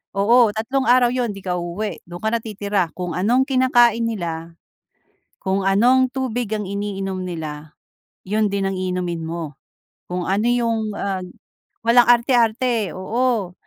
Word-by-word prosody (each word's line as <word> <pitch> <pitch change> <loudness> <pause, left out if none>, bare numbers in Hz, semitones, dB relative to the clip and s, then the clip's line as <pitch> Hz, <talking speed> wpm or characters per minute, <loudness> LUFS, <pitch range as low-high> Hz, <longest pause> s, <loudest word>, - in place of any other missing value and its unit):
Oo, 230 +3 +5
tatlong 260 +5 -1
araw 245 0 +5
'yon, 245 -4 -1
'di 195 - -10
ka 180 -1 -2
uuwi. 175 +5 -4
Dun 175 0 -9
ka 220 - +2
na 235 - +1
titira. 205 -4 -2
Kung 180 -1 -4
anong 240 +8 +3
kinakain 240 -3 +4
nila, 170 -5 -5 0.9
kung 190 +1 0
anong 250 +6 +4
tubig 245 -4 -2
ang 210 - -4
iniinom 195 -2 -3
nila, 155 -3 -6 0.5
yun 210 +2 +1
din 200 0 -2
ang 190 - -4
iinumin 180 -2 -2
mo. 160 -4 -6 0.5
Kung 180 0 -3
ano 205 +4 +1
yung, 230 -3 0
ah, 195 -1 -2 0.7
walang 235 +1 +5
arte-arte 235 - +2
oo, 220 -1 -1
210 Hz, 145 wpm, -21 LUFS, 185-240 Hz, 0.9 s, Oo